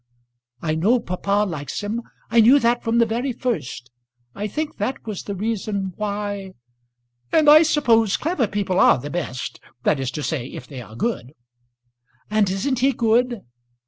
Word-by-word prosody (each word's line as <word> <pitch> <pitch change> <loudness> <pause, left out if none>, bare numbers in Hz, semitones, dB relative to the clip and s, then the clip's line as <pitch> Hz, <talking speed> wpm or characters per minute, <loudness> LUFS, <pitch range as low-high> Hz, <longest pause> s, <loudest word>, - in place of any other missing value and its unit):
"I 155 -2 0
know 205 +11 +3
papa 200 +1 0
likes 145 -3 -5
him. 220 +3 -2 0.3
I 235 - +5
knew 245 +6 +7
that 240 -2 +1
from 230 +1 +1
the 235 - +5
very 240 +4 -2
first. 210 - -4 0.4
I 210 - -3
think 300 +8 -4
that 265 - -3
was 215 -4 -4
the 200 - -5
reason 200 -2 -2
why 205 -2 -4 0.4
" 120 0 -47
"And 310 -2 +3
I 305 +1 +9
suppose 230 -10 +3
clever 310 -7 0
people 195 -2 -1
are - - +6
the 145 +4 -7
best, 150 -8 -4 0.2
that 145 - +2
is 135 -2 -2
to 150 - -3
say, 140 -6 -2
if - - -9
they 130 -2 -8
are 110 -2 -12
good." 145 - -3 1.0
"And 215 -2 +3
isn't 230 +8 -1
he 270 +2 +3
good?" 235 0 +1
210 Hz, 175 wpm, -22 LUFS, 165-235 Hz, 1.0 s, I